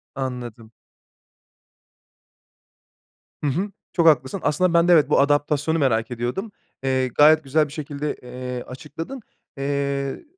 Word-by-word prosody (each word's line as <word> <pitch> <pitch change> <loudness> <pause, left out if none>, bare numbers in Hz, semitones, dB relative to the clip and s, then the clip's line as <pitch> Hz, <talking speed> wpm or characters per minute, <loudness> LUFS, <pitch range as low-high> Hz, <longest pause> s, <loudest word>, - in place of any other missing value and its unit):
Anladım. 120 -4 -6 2.7
Hı - - +1
hı. 190 +9 -2 0.2
Çok 170 -2 +3
haklısın. 135 +3 +3
Aslında 165 +4 +2
ben 170 +1 +4
de 175 - +6
evet, 155 -4 +5
bu - - +4
adaptasyonu 145 +2 +2
merak 115 -4 +1
ediyordum. 125 - -3 0.3
Eee, 130 -1 +1
gayet 150 +4 +5
güzel 150 +2 +2
bir 145 - -12
şekilde, 150 -1 -4
eee, 125 0 -6
açıkladın. 165 - -8 0.4
Eee, 140 - -2
140 Hz, 120 wpm, -23 LUFS, 130-155 Hz, 2.7 s, de